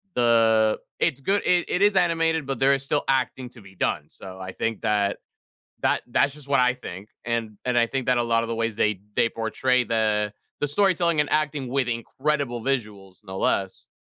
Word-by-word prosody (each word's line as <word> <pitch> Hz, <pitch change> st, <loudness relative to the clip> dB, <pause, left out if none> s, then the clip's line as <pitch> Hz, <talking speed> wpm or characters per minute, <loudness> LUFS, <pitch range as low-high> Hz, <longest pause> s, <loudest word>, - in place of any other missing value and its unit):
The 115 Hz, -2 st, +3 dB, 0.2 s
it's 135 Hz, -, +1 dB
good 200 Hz, +7 st, +1 dB
it 175 Hz, -1 st, +2 dB
it 180 Hz, -, 0 dB
is 205 Hz, 0 st, +4 dB
animated, 165 Hz, -3 st, +2 dB
but 135 Hz, -3 st, -3 dB
there 135 Hz, +1 st, +5 dB
is 135 Hz, -1 st, -1 dB
still 145 Hz, +1 st, 0 dB
acting 130 Hz, -1 st, 0 dB
to 125 Hz, -, -13 dB
be 95 Hz, -1 st, -16 dB
done, 75 Hz, -4 st, -1 dB
so 95 Hz, +2 st, -11 dB
I 95 Hz, 0 st, -6 dB
think 115 Hz, +2 st, -3 dB
that 100 Hz, -1 st, +1 dB, 0.6 s
that -, -, +1 dB
that's 135 Hz, +3 st, +2 dB
just 150 Hz, -1 st, -13 dB
what 140 Hz, -1 st, +3 dB
I 125 Hz, 0 st, +4 dB
think, 105 Hz, -5 st, -9 dB, 0.2 s
and 115 Hz, -3 st, -2 dB
and 125 Hz, -1 st, +1 dB
I 115 Hz, -1 st, +4 dB
think 135 Hz, 0 st, -3 dB
that 125 Hz, -1 st, +2 dB
a 120 Hz, -, +2 dB
lotta 115 Hz, 0 st, +1 dB
the 115 Hz, -, -3 dB
ways 115 Hz, -1 st, -1 dB
they 105 Hz, -3 st, 0 dB
they -, -, +3 dB
portray 125 Hz, +3 st, 0 dB
the 110 Hz, -3 st, 0 dB, 0.3 s
the 145 Hz, -, +1 dB
storytelling 170 Hz, -1 st, +2 dB
and 150 Hz, -, +1 dB
acting 150 Hz, -3 st, 0 dB
with 135 Hz, 0 st, 0 dB
incredible 125 Hz, +1 st, -2 dB
visuals, 105 Hz, -8 st, -3 dB
no 95 Hz, -1 st, -7 dB
less, 95 Hz, -1 st, -1 dB
120 Hz, 200 wpm, -24 LUFS, 110-140 Hz, 0.6 s, there